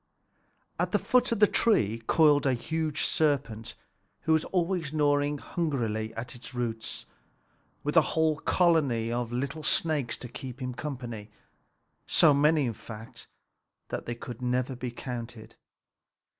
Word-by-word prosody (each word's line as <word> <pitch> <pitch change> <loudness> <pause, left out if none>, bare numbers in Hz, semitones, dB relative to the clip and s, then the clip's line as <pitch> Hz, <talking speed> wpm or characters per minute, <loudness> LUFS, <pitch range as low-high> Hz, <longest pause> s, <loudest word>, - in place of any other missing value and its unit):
At - - 0
the - - +5
foot 250 -1 +2
of 230 - +1
the 210 - +8
tree 115 - +2
coiled 150 -3 +5
a 130 - +3
huge 155 +4 -1
serpent, 115 -7 0 0.5
who 160 - +2
was 160 - +2
always 175 -4 -1
gnawing 145 -1 +2
hungrily 120 - -2
at 120 +2 -5
its 125 +1 -7
roots, 115 -2 -3 0.8
with 150 +2 -2
a 165 - +8 0.2
whole 160 -1 +3
colony 145 -11 +2
of 120 -1 -2
little 140 +5 -3
snakes 150 -4 +1
to 125 - -7
keep 130 +1 -8
him 125 -1 -4
company, 120 -6 -6 0.8
so 155 -3 +5
many 150 0 +3
that 115 +1 -9 0.8
they 120 - -2
could 120 0 -8
never 125 +1 0
be 125 0 -4
counted. 120 -2 -7
130 Hz, 135 wpm, -28 LUFS, 120-155 Hz, 0.8 s, the